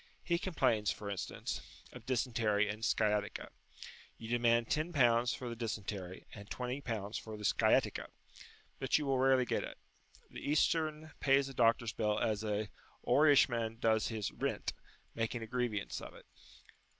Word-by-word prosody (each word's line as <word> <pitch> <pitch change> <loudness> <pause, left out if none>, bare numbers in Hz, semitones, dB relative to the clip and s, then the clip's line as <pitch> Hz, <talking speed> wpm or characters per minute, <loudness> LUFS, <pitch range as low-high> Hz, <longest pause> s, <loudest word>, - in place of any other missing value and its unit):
He 170 -1 +1
complains, 125 - +1
for 100 -1 -3
instance, 100 - -4 0.3
of 125 -2 -11
dysentery 115 -5 +1
and 105 +2 -5
sciatica. 105 -2 0 0.7
You 115 - -8
demand 120 -1 +3
L10 125 -7 +2
for 125 - -6
the 120 - -4
dysentery, 100 -5 -5
and 100 -1 -10
L20 125 -5 -3
for 110 -1 -8
the 105 - -6
sciatica. - - +2 0.7
But 135 -1 +2
you 150 - -2
will 135 -2 +1
rarely 130 -1 +4
get - - -1
it. - - -7 0.5
The - - -7
Eastern 155 +1 +1
pays 135 0 +3
a - - -8
doctor's 115 -2 +2
bill 105 -1 0
as 110 -2 0
an 105 -1 -2 0.4
Oirishman 120 -6 +4
does 110 -2 +2
his 110 -3 -3
"rint," - - -2 0.4
making 115 +1 -2
a - - -4
grievance 115 -3 -2
of - - -9
it. - - -15
115 Hz, 150 wpm, -34 LUFS, 105-130 Hz, 0.7 s, rarely